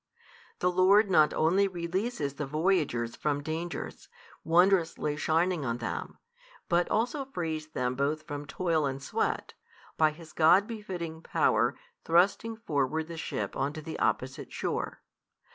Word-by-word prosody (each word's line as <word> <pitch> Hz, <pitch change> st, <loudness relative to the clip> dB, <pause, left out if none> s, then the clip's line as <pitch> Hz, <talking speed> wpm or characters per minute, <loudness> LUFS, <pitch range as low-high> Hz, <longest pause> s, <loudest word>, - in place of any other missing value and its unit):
The 180 Hz, -, +1 dB
Lord 190 Hz, +3 st, +5 dB
not 155 Hz, -4 st, +5 dB
only 185 Hz, +5 st, +3 dB
releases 175 Hz, -, -2 dB
the 145 Hz, 0 st, -4 dB
voyagers 150 Hz, -7 st, 0 dB
from 145 Hz, -1 st, -1 dB
dangers, 165 Hz, +3 st, -5 dB, 0.3 s
wondrously 170 Hz, -3 st, +3 dB
shining 165 Hz, +2 st, +1 dB
on 120 Hz, -2 st, -1 dB
them, 120 Hz, -, -5 dB, 0.5 s
but 175 Hz, 0 st, +2 dB
also 245 Hz, +6 st, 0 dB
frees 160 Hz, -10 st, -4 dB
them 125 Hz, -5 st, -2 dB
both 145 Hz, +4 st, -1 dB
from 145 Hz, -2 st, -6 dB
toil 165 Hz, -4 st, 0 dB
and 135 Hz, 0 st, -3 dB
sweat, -, -, -1 dB, 0.4 s
by 155 Hz, -1 st, +5 dB
His 160 Hz, +1 st, -12 dB
God 175 Hz, +5 st, +5 dB
befitting 180 Hz, -8 st, -6 dB
Power -, -, +2 dB, 0.3 s
thrusting 195 Hz, +7 st, +2 dB
forward 155 Hz, -, -1 dB
the 170 Hz, -, -6 dB
ship 160 Hz, -, -4 dB
on 140 Hz, +2 st, -1 dB
to 155 Hz, -, -7 dB
the 160 Hz, -, -6 dB
opposite 130 Hz, +1 st, -1 dB
shore. -, -, -3 dB
165 Hz, 140 wpm, -29 LUFS, 150-185 Hz, 0.5 s, Lord